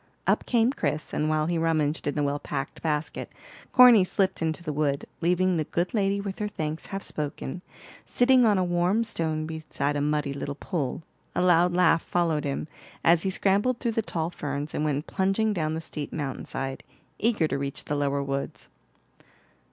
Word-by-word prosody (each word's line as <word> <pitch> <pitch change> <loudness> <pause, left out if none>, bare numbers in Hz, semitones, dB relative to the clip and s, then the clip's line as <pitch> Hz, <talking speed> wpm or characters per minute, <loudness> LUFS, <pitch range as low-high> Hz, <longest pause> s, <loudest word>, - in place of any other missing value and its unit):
Up - - +1
came 240 +1 +3
Chris, 155 - -2
and 155 - 0
while 155 0 +1
he 170 0 0
rummaged 155 -2 0
in 145 - -1
the 150 - +1
well 145 0 0
packed 135 -1 -5
basket, 150 -1 -2 0.4
Corny 245 -5 +8
slipped 190 0 0
into 160 +1 -1
the 155 - -3
wood, 140 -1 0 0.2
leaving 180 +1 +2
the 155 - +1
good 175 +4 -1
lady 200 -2 +1
with 200 -1 -5
her 210 - -1
thanks 155 -5 -4
half 195 0 -5
spoken, 150 +2 -4 0.4
sitting 250 0 +4
on 210 -3 +4
a 185 - +2
warm 175 +5 +2
stone 160 -7 -2
beside 155 -2 -3
a 145 - 0
muddy 150 -1 0
little 140 0 -4
pool. 150 -2 -3 0.3
A - - +1
loud 175 0 +4
laugh 170 -2 +4
followed 165 -4 0
him, 140 +2 -2 0.4
as 165 0 +5
he 190 - 0
scrambled 205 +6 +1
through 235 -2 -1
the 225 - 0
tall 170 -5 -3
ferns 145 -1 -4
and - - -1
went 150 0 -1
plunging 195 +3 +1
down 160 -4 -1
the 160 - -3
steep 150 -2 -6
mountain 140 -4 -4
side, 135 0 -4 0.4
eager 215 -8 +2
to 140 -2 -2
reach 140 0 -4
the - - -2
lower 140 -1 0
woods. 140 0 -4
160 Hz, 190 wpm, -26 LUFS, 145-190 Hz, 0.4 s, Corny